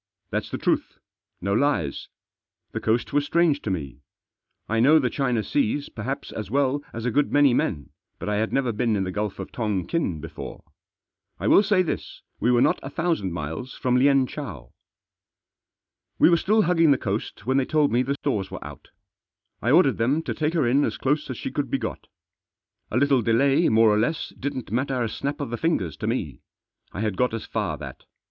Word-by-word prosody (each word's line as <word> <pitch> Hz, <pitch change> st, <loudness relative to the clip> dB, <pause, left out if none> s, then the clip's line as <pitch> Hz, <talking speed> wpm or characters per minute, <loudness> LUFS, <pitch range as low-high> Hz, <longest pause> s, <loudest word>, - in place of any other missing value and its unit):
Thaf -, -, +2 dB
s -, -, -11 dB
the -, -, -3 dB
truth. -, -, -1 dB, 0.4 s
No 100 Hz, +2 st, 0 dB
lies! 110 Hz, -, 0 dB, 0.6 s
The -, -, -3 dB
coast 115 Hz, +4 st, 0 dB
was 145 Hz, 0 st, +3 dB
strange 160 Hz, -2 st, +2 dB
to -, -, -4 dB
me. 70 Hz, -7 st, -4 dB, 0.7 s
I 115 Hz, +1 st, 0 dB
know 145 Hz, +7 st, +6 dB
the 125 Hz, -6 st, +1 dB
China 125 Hz, -6 st, 0 dB
Seas 265 Hz, -, 0 dB
perhaps 125 Hz, +5 st, -5 dB
as 105 Hz, -3 st, -6 dB
well 140 Hz, +2 st, +1 dB
as 115 Hz, 0 st, -6 dB
a 125 Hz, -, +1 dB
good 145 Hz, +4 st, +1 dB
many 145 Hz, -3 st, +5 dB
men, 75 Hz, -, -1 dB, 0.3 s
but -, -, -7 dB
I 105 Hz, 0 st, 0 dB
had 110 Hz, +1 st, 0 dB
never 130 Hz, -3 st, +1 dB
been 115 Hz, 0 st, 0 dB
in 95 Hz, -, 0 dB
the 95 Hz, -, -3 dB
Gulf 105 Hz, +1 st, -3 dB
of 95 Hz, -, -7 dB
Tongkin 105 Hz, -, -1 dB
before. 80 Hz, +1 st, -8 dB, 0.8 s
I -, -, -2 dB
will -, -, +7 dB
say 200 Hz, -2 st, +3 dB
this, 170 Hz, -, -5 dB, 0.2 s
we 120 Hz, -, +1 dB
were 120 Hz, 0 st, +4 dB
not -, -, +2 dB
a 135 Hz, -, -6 dB
thousand 160 Hz, -, -1 dB
miles 80 Hz, -, -5 dB
from 125 Hz, -1 st, 0 dB
Lienchow. 135 Hz, -, +1 dB, 1.5 s
We -, -, +6 dB
were -, -, +6 dB
still 215 Hz, +6 st, +3 dB
hugging 165 Hz, -3 st, +3 dB
the 140 Hz, -, +5 dB
coast 100 Hz, -2 st, -4 dB
when 130 Hz, +2 st, +2 dB
they 135 Hz, -, +2 dB
told 150 Hz, 0 st, +2 dB
me 120 Hz, -, +3 dB
the 135 Hz, +2 st, -1 dB
stores 110 Hz, -10 st, -2 dB
were -, -, -8 dB
out. -, -, -11 dB, 0.7 s
I 120 Hz, -, 0 dB
ordered 140 Hz, -4 st, +4 dB
them 135 Hz, +8 st, +1 dB
to -, -, -3 dB
take 155 Hz, +2 st, -1 dB
her 155 Hz, -6 st, +2 dB
in 135 Hz, +5 st, +3 dB
as -, -, -1 dB
close 150 Hz, +2 st, 0 dB
as 130 Hz, -, -4 dB
she -, -, -5 dB
could -, -, -2 dB
be -, -, +1 dB
got. -, -, -5 dB, 0.8 s
A 110 Hz, -, -1 dB
little 140 Hz, -1 st, +3 dB
delay 135 Hz, +8 st, +3 dB
more 110 Hz, 0 st, +5 dB
or 105 Hz, -, +2 dB
less 135 Hz, +8 st, -1 dB
didn't 130 Hz, -6 st, -5 dB
matter 130 Hz, +1 st, 0 dB
a -, -, 0 dB
snap 140 Hz, +6 st, -4 dB
of 145 Hz, -5 st, -4 dB
the 120 Hz, -, -2 dB
fingers 110 Hz, -, 0 dB
to -, -, -4 dB
me. -, -, -3 dB, 0.5 s
I 100 Hz, -, -5 dB
had 105 Hz, -3 st, -1 dB
got 125 Hz, -2 st, +1 dB
as 115 Hz, -, -5 dB
far 100 Hz, -9 st, -2 dB
that. -, -, -9 dB
125 Hz, 205 wpm, -24 LUFS, 110-145 Hz, 1.5 s, will